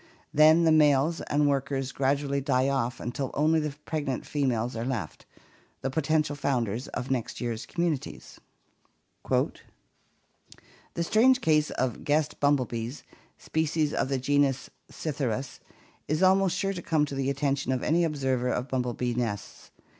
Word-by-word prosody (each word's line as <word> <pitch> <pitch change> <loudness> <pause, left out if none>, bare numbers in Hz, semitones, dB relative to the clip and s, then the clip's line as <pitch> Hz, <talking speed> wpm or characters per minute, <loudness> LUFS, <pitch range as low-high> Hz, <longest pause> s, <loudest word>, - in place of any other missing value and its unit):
Then 155 +3 +6
the 165 - +4
males 150 +1 +4
and 145 0 +1
workers 135 -1 -1
gradually 140 +1 0
die 130 -1 +1
off 125 -3 -1
until 125 +3 -3
only 155 +2 +3
the 150 -2 -3
pregnant 145 -5 -3
females 125 -5 -1
are 115 - -3
left 120 -11 -4 0.3
— - - -34
the 135 - -1
potential 155 0 +1
founders 125 -4 -1
of 125 +1 -5
next 125 -4 -2
year's 115 -1 -4
communities. 145 - -3 0.9
"The - - +1 1.4
strange 250 +8 +4
case 155 -1 +3
of 130 -2 -1
the - - -14
guest 150 +1 0
bumblebees, 130 -3 0 0.3
species 155 -1 -1
of - - 0
the 135 - 0
genus 135 0 +1 0.2
Psitkyrus, 135 -4 -3 0.5
is 155 +5 0
almost 190 -1 +4
sure 195 +1 0
to 180 - -6
come 155 -3 +1
to 145 - -8
the 135 0 -1
attention 140 -1 -1
of 130 -1 -1
any 170 +2 +2
observer 135 -5 0
of 125 +1 -2
bumblebee 125 -1 -1
nests. 115 -4 -4
140 Hz, 145 wpm, -27 LUFS, 125-155 Hz, 1.4 s, Then